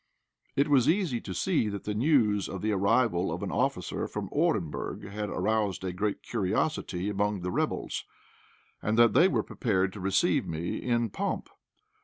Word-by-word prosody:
It 140 Hz, +2 st, +3 dB
was 140 Hz, -3 st, +4 dB
easy 165 Hz, -, +1 dB
to 95 Hz, -, -7 dB
see 145 Hz, -, +1 dB
that 100 Hz, -1 st, -5 dB
the 105 Hz, -, -2 dB
news 110 Hz, -5 st, +2 dB
of 95 Hz, -, -6 dB
the 110 Hz, -, +1 dB
arrival 100 Hz, -2 st, +2 dB
of -, -, -4 dB
an -, -, -3 dB
officer -, -, -1 dB
from -, -, -5 dB
Orenburg 80 Hz, +4 st, -1 dB
had 105 Hz, +1 st, -4 dB
aroused 105 Hz, -4 st, 0 dB
a 90 Hz, -1 st, -2 dB
great 100 Hz, +3 st, -2 dB
curiosity 100 Hz, -, -1 dB
among 105 Hz, -1 st, 0 dB
the 90 Hz, +1 st, -3 dB
rebels, -, -, -2 dB, 0.8 s
and 110 Hz, +1 st, 0 dB
that 115 Hz, -2 st, +6 dB
they 175 Hz, -, +6 dB
were -, -, +1 dB
prepared 95 Hz, -6 st, 0 dB
to 105 Hz, -, -8 dB
receive 95 Hz, +1 st, +2 dB
me 80 Hz, +2 st, -3 dB
in 120 Hz, -3 st, 0 dB
pomp. 200 Hz, -, -3 dB
105 Hz, 170 wpm, -29 LUFS, 95-120 Hz, 0.8 s, that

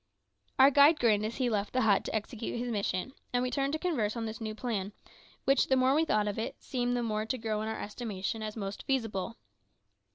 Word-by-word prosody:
Our 270 Hz, +2 st, +8 dB
guide 290 Hz, +3 st, +6 dB
grinned 215 Hz, -3 st, +3 dB
as 230 Hz, -, -6 dB
he 255 Hz, -2 st, +1 dB
left 210 Hz, -3 st, -1 dB
the 255 Hz, -, +2 dB
hut 210 Hz, -3 st, +3 dB
to -, -, -3 dB
execute 220 Hz, +2 st, -3 dB
his 240 Hz, 0 st, -2 dB
mission, 200 Hz, +3 st, -2 dB, 0.2 s
and 245 Hz, 0 st, +1 dB
we 250 Hz, -, -1 dB
turned 275 Hz, +1 st, 0 dB
to -, -, +1 dB
converse 255 Hz, -, -1 dB
on 230 Hz, -, -2 dB
this 220 Hz, +1 st, -6 dB
new 215 Hz, -1 st, -4 dB
plan, 215 Hz, -4 st, -3 dB, 0.5 s
which, 275 Hz, +1 st, +4 dB
the 265 Hz, -, +3 dB
more 260 Hz, +1 st, +4 dB
we 315 Hz, +3 st, +3 dB
thought 210 Hz, -7 st, +1 dB
of 205 Hz, +1 st, -2 dB
it, 225 Hz, -, -3 dB
seemed 245 Hz, -2 st, -1 dB
the 240 Hz, -, -1 dB
more 215 Hz, -1 st, -1 dB
to 255 Hz, -, -1 dB
grow 220 Hz, -2 st, -2 dB
in 215 Hz, -, -3 dB
our 220 Hz, -, -3 dB
estimation 210 Hz, -1 st, -4 dB
as 215 Hz, 0 st, -5 dB
most 200 Hz, -1 st, -4 dB
feasible. 225 Hz, -5 st, -1 dB
225 Hz, 230 wpm, -30 LUFS, 215-255 Hz, 0.5 s, Our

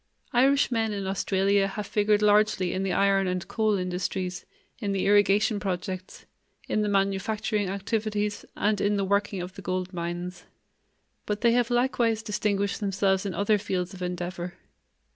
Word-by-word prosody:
Irishmen 245 Hz, -4 st, +3 dB
in 200 Hz, -1 st, -3 dB
Australia 195 Hz, +1 st, +1 dB
have 205 Hz, +1 st, -5 dB
figured 210 Hz, 0 st, +2 dB
largely 210 Hz, -3 st, +3 dB
in 185 Hz, -, -1 dB
the 195 Hz, -1 st, -1 dB
iron 195 Hz, 0 st, +3 dB
and 180 Hz, -1 st, -2 dB
coal 215 Hz, -2 st, +1 dB
industries, 180 Hz, 0 st, -3 dB, 0.3 s
in 205 Hz, -4 st, -2 dB
the 195 Hz, -, 0 dB
irrigation 205 Hz, +1 st, +4 dB
projects, 185 Hz, -1 st, -5 dB, 0.4 s
in 215 Hz, -, +1 dB
the 210 Hz, -, 0 dB
manufacturing 200 Hz, +1 st, 0 dB
activities, 210 Hz, +1 st, -2 dB
and 210 Hz, 0 st, +1 dB
in 205 Hz, 0 st, +2 dB
the 195 Hz, -, 0 dB
working 200 Hz, -1 st, 0 dB
of 180 Hz, +1 st, -8 dB
the 195 Hz, -, -10 dB
gold 185 Hz, 0 st, -3 dB
mines. 175 Hz, +1 st, -5 dB, 0.8 s
But 210 Hz, 0 st, -2 dB
they 235 Hz, -, +5 dB
have 240 Hz, 0 st, +2 dB
likewise 240 Hz, -3 st, +1 dB
distinguished 205 Hz, -2 st, -1 dB
themselves 195 Hz, -1 st, +1 dB
in 185 Hz, -, -4 dB
other 205 Hz, +3 st, +2 dB
fields 180 Hz, -1 st, -2 dB
of 185 Hz, -, -10 dB
endeavor. 180 Hz, 0 st, -4 dB
200 Hz, 155 wpm, -27 LUFS, 185-210 Hz, 0.8 s, they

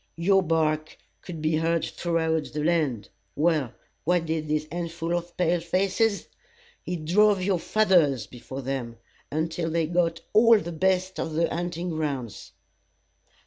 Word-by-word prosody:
Your 190 Hz, +3 st, +4 dB
bark 155 Hz, -2 st, 0 dB, 0.2 s
could 165 Hz, -4 st, -8 dB
be 155 Hz, 0 st, +2 dB
heard 165 Hz, +1 st, +1 dB
throughout 160 Hz, -2 st, -1 dB
the 150 Hz, 0 st, -2 dB
land. 150 Hz, -10 st, 0 dB, 0.3 s
Well, 150 Hz, -5 st, +1 dB, 0.3 s
what 175 Hz, 0 st, +1 dB
did 160 Hz, -1 st, -2 dB
this 155 Hz, 0 st, 0 dB
handful 170 Hz, 0 st, -3 dB
of 175 Hz, 0 st, -5 dB
pale 175 Hz, -1 st, +2 dB
faces? 195 Hz, +5 st, 0 dB, 0.6 s
It 175 Hz, -3 st, -4 dB
drove 200 Hz, +3 st, +4 dB
your 190 Hz, -2 st, +1 dB
fathers 175 Hz, -, +3 dB
before 130 Hz, +2 st, -8 dB
them, 125 Hz, -3 st, -4 dB, 0.3 s
until 160 Hz, +2 st, -1 dB
they 165 Hz, 0 st, +1 dB
got 170 Hz, +1 st, 0 dB
all 225 Hz, +1 st, +7 dB
the 170 Hz, -4 st, -4 dB
best 185 Hz, +2 st, 0 dB
of 160 Hz, -, -3 dB
the 165 Hz, +2 st, +2 dB
hunting 175 Hz, +1 st, -3 dB
grounds. 140 Hz, -8 st, -4 dB
165 Hz, 145 wpm, -26 LUFS, 155-180 Hz, 0.6 s, all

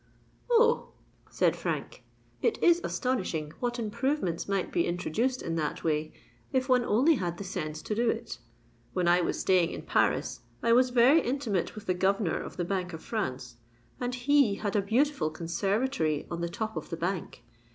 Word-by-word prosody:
"Oh!" 470 Hz, -1 st, +3 dB, 0.4 s
said -, -, +2 dB
Frank, -, -, -4 dB, 0.4 s
"it 455 Hz, -1 st, +1 dB
is 345 Hz, 0 st, +5 dB
astonishing 185 Hz, -, -2 dB
what 240 Hz, 0 st, -1 dB
improvements 220 Hz, -, -1 dB
might 195 Hz, -2 st, -1 dB
be 170 Hz, -, +1 dB
introduced 220 Hz, +9 st, -1 dB
in 165 Hz, 0 st, -2 dB
that 150 Hz, -2 st, -2 dB
way, 155 Hz, -1 st, 0 dB, 0.4 s
if 260 Hz, -1 st, +1 dB
one 250 Hz, -2 st, +4 dB
only 255 Hz, +9 st, +4 dB
had 175 Hz, -3 st, -3 dB
the 200 Hz, -, -5 dB
sense 155 Hz, -4 st, -5 dB
to -, -, -2 dB
do 235 Hz, +2 st, +2 dB
it. -, -, -3 dB, 0.5 s
When 180 Hz, -2 st, +1 dB
I 175 Hz, +1 st, +5 dB
was -, -, -1 dB
staying 180 Hz, -3 st, +3 dB
in -, -, -6 dB
Paris, -, -, +1 dB, 0.2 s
I 230 Hz, -, +4 dB
was 250 Hz, +1 st, +5 dB
very 250 Hz, +6 st, +5 dB
intimate 240 Hz, -9 st, -1 dB
with 215 Hz, -, -9 dB
the 185 Hz, -, +1 dB
Governor 190 Hz, 0 st, +1 dB
of -, -, -8 dB
the 175 Hz, -, -1 dB
Bank 180 Hz, -1 st, -2 dB
of 160 Hz, -, -8 dB
France, 130 Hz, -, -4 dB, 0.4 s
and 245 Hz, 0 st, -2 dB
he 260 Hz, -4 st, +3 dB
had 205 Hz, 0 st, -3 dB
a 205 Hz, -, +4 dB
beautiful 255 Hz, -, +1 dB
conservatory 170 Hz, -, -1 dB
on 170 Hz, 0 st, -3 dB
the 170 Hz, -, -1 dB
top 220 Hz, +5 st, -4 dB
of -, -, -5 dB
the 165 Hz, -, -4 dB
Bank. 175 Hz, -7 st, -3 dB
200 Hz, 180 wpm, -29 LUFS, 170-250 Hz, 0.5 s, is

